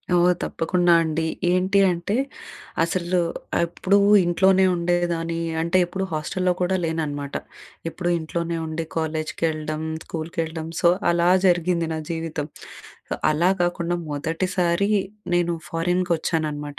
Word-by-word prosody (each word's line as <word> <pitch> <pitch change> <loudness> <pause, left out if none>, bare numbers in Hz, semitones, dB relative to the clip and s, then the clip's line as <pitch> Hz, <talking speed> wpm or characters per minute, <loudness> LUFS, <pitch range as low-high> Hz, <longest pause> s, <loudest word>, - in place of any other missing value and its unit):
ఓ! - - +5 0.3
తప్పకుండా 175 +1 +2
అండి. 160 0 -1 0.3
ఏంటి 185 +2 +3
అంటే 175 +5 -1 0.7
అసలు 175 +1 0 0.5
ఎప్పుడు 185 +3 +1 0.3
ఇంట్లోనే 190 +2 +4
ఉండేదాని 170 -1 0 0.2
అంటే 170 +2 +2
ఎప్పుడూ 190 +2 -4
హాస్టల్లో 180 +4 0
కూడా 180 +1 +2
లేనన్నమాట. 145 -3 -3 0.5
ఎప్పుడు 175 +1 -3
ఇంట్లోనే 170 +1 -3
ఉండి 160 +1 -3
కాలేజ్‌కెళ్ళడం, 155 -1 -2 0.2
స్కూల్‌‌కెళ్ళడం 160 0 -4
సో 170 - +6 0.2
అలా 170 0 +3 0.2
జరిగింది 175 -1 +2
నా 160 - -3
జీవితం. 160 -3 -3 0.6
సో - - 0 0.2
అలా 165 +4 +3
కాకుండా 175 0 0
మొదటిసారి 170 +5 0 0.4
నేను 175 -1 +2
ఫారిన్‍కి 175 +2 0
వచ్చాననమాట. 150 -3 -3
170 Hz, 110 wpm, -23 LUFS, 160-175 Hz, 0.7 s, సో